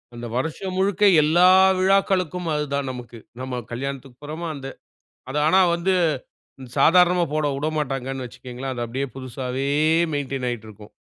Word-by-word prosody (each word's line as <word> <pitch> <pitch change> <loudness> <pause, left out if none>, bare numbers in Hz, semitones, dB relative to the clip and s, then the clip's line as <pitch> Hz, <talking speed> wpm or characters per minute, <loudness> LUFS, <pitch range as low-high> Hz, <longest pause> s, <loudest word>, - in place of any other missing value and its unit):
அந்த 120 0 -6
வருஷம் 160 +8 -3
முழுக்க 200 +2 +1 0.2
எல்லா 175 +4 +5 0.3
விழாக்களுக்கும் 185 -3 +1
அது 150 - 0
தான் 140 -1 -1
நமக்கு. 120 -2 -9 0.2
நம்ம 130 -1 -4
கல்யாணத்துக்குப் 135 +1 -6
போறமா 155 +3 -5
அந்த 135 -1 -7 0.6
அது 145 - -1
ஆனா 185 +5 +5 0.2
வந்து 180 +2 0 0.8
சாதாரணமா 180 +3 +5
போடவுடமாட்டாங்கன்னு 140 -3 -2
வச்சுக்குங்களேன். 125 +2 -7
அது 120 -1 -3
அப்டியே 130 +4 -3
புதுசாவே 130 +1 -4 0.5
மெயின்டய்ன் 135 -2 -3
ஆயிட்டு 115 -3 -5
இருக்கும். 105 0 -13
140 Hz, 130 wpm, -23 LUFS, 125-170 Hz, 0.8 s, எல்லா